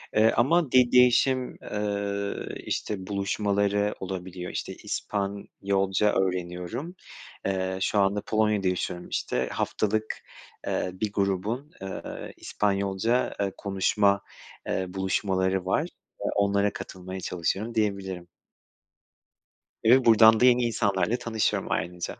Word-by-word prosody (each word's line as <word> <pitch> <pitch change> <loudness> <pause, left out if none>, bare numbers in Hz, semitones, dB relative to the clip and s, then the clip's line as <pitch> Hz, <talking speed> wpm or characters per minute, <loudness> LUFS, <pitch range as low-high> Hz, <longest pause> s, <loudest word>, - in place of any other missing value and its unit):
eee, 110 +1 +5
ama 145 +4 +3
de 125 -1 +5
değişim, 125 +1 +4
eee, 100 -1 -2 0.3
işte, 95 -3 -3
buluşmaları 100 +1 0
olabiliyor. 90 -1 -5
İşte, - - -4
İspanyolca 100 0 -1
öğreniyorum. 95 - -2 0.5
Eee, 95 -1 -1
şu 105 - +2
anda 100 +1 +2
Polonya'da 105 -3 +1
yaşıyorum, 90 -1 -2
işte. - - -1
Haftalık, 110 +1 -1 0.5
eee, 90 - -1
bir 105 +2 -3
grubun, 100 +8 -1
eee, 95 -1 -6
İspanyolca, 100 +4 0
eee, 100 -1 -1
konuşma, 100 0 +2 0.5
eee, 95 - -1
buluşmaları 95 0 0
var. 95 - +2 0.4
Eee, - - -3
onlara 100 0 +2
katılmaya 95 0 -7
çalışıyorum, 95 +6 -2
diyebilirim. 95 -5 -1 1.6
Ve 125 +3 +6
buradan 110 -1 +7
da 125 - +5
yeni 125 -1 +5
insanlarla 110 0 +1
tanışıyorum 115 -3 -1
ayrıca. 85 +2 -2
100 Hz, 110 wpm, -27 LUFS, 95-110 Hz, 1.6 s, buradan